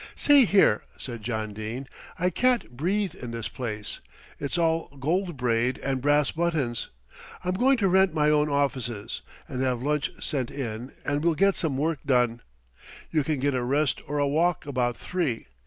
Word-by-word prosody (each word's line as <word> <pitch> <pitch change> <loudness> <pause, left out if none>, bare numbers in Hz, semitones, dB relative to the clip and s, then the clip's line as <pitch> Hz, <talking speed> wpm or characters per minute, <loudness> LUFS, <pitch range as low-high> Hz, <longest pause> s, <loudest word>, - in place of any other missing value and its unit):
"See 285 -3 +6
here," 195 - +4 0.2
said 120 -3 -7
John 110 -1 -3
Dene, 110 +6 -5 0.3
"I 180 +1 +1
can't 250 - +1
breathe 185 +8 -1
in 120 - -8
this 115 -1 -4
place. 110 -4 -5 0.4
It's 140 +4 -2
all 165 -1 +1
gold 175 +3 0
braid 125 0 +1
and 135 -1 -2
brass 145 +1 +3
buttons. 155 -9 -1 0.6
I'm 180 - +1
going 255 +7 +3
to 200 -4 +2
rent 190 0 +4
my 150 -1 +2
own 150 0 +3
offices, 130 -7 -1 0.3
and 130 - -4
have 125 -2 0
lunch 150 0 0
sent 130 -5 -1
in 120 -2 -5
and 145 +1 0
we'll 170 -1 +3
get 195 +3 +3
some 150 -6 -1
work 155 +1 0
done. 125 -4 +2 0.7
You 155 -2 +2
can 150 +1 -1
get 140 +1 +1
a 125 - 0
rest 140 +4 +1
or 145 +2 -2
a 145 -1 +2
walk 165 +4 +1
about 125 -4 -1
three. 165 -11 -2
145 Hz, 175 wpm, -26 LUFS, 125-165 Hz, 0.7 s, See